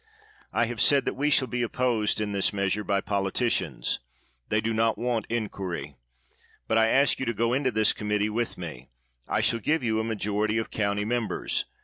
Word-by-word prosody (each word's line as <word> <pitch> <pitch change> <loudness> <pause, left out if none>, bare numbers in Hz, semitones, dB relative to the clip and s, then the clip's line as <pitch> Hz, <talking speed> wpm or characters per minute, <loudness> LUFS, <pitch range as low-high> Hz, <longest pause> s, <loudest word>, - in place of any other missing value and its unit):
I 120 - +2
have 115 -1 -3
said 140 -1 +5
that - - 0
we 145 +3 0
shall 135 -3 +4
be 120 +1 -2
opposed 120 -3 0
in 105 -1 -2
this 100 -1 +1
meas 100 -1 0
ure 105 - -4
by 100 -1 0
politicians; 100 +5 0 0.5
they 110 - +2
do 115 +1 -1
not 110 0 +2
want 120 0 -1
inquiry. 95 -10 -4 0.7
But 110 - +3
I 110 - +5
ask 140 +5 +3
you 130 - -1
to 120 - -1
go 115 +2 +1
into 130 0 +2
this 110 -2 +3
committee 105 0 0
with 115 +2 -2
me. 80 -8 -8 0.4
I - - 0
will 115 - -3
give 150 +6 0
you 110 -2 +1
a - - 0
majoritv 105 0 0
of 115 - -4
county 100 -1 0
mem 120 0 0
bers. - - -1
110 Hz, 205 wpm, -27 LUFS, 105-120 Hz, 0.7 s, said